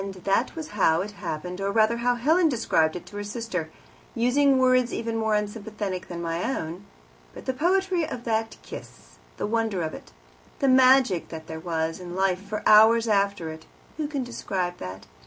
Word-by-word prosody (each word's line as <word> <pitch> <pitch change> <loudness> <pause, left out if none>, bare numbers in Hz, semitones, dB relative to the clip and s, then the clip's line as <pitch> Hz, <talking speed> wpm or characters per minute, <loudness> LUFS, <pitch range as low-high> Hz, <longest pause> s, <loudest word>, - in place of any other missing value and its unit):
That 200 +6 +1
was 320 -2 -6
"how 175 -5 +2
it 205 +2 -5
happened," 180 -2 -5
or, 195 0 0
rather, 220 +2 +3
how 245 +1 +1
Helen 315 +8 +3
described 165 - +1
it 180 - -7
to 205 - -10
her 205 - -3
sister, 205 -6 -4 0.5
using 265 +3 +3
words 255 -1 +3
even 230 0 -3
more 220 -1 +1
unsympathetic 205 -3 -4
than 170 -1 -6
my 165 +1 -2
own. 185 -7 -4 0.5
But - - -10
the 260 - -1
poetry 360 +3 +1
of 240 - -6
that 225 -1 -1
kiss, - - -11 0.2
the - - -2
wonder 220 -4 0
of 155 - -3
it, - - -11 0.5
the 275 - +1
magic 255 -7 +5
that 160 -1 -8
there 160 0 -7
was 160 0 -2
in 175 -1 -7
life 190 -1 +1
for 205 +2 -5
hours 225 +2 +7
after 200 -5 +1
it 160 0 -11 0.3
who 305 -2 -2
can 285 -3 -3
describe 185 -7 -3
that? 95 +1 -7
210 Hz, 185 wpm, -25 LUFS, 180-245 Hz, 0.5 s, hours